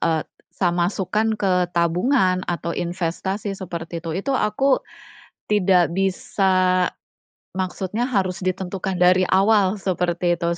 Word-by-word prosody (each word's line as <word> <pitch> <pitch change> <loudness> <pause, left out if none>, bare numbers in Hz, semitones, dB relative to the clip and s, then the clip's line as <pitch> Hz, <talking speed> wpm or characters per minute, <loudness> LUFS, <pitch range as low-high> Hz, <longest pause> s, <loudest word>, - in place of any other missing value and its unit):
e 160 -2 +1 0.3
sa 180 - +1
masukkan 190 +5 0
ke 185 -4 +1
tabungan 185 +3 +2
atau 170 -1 -3
investasi 190 +3 -3
seperti 170 -2 -6
itu. 165 -1 -5
Itu 200 +10 -2
aku 260 +6 +2 0.7
tidak 185 -4 +3
bisa 185 -1 +1 0.7
maksudnya 190 +5 -2
harus 190 -6 -1
ditentukan 185 0 -3
dari 180 +1 +4
awal, 200 0 +3
seperti 180 -2 0
itu, 170 0 -1
185 Hz, 115 wpm, -22 LUFS, 175-195 Hz, 0.7 s, dari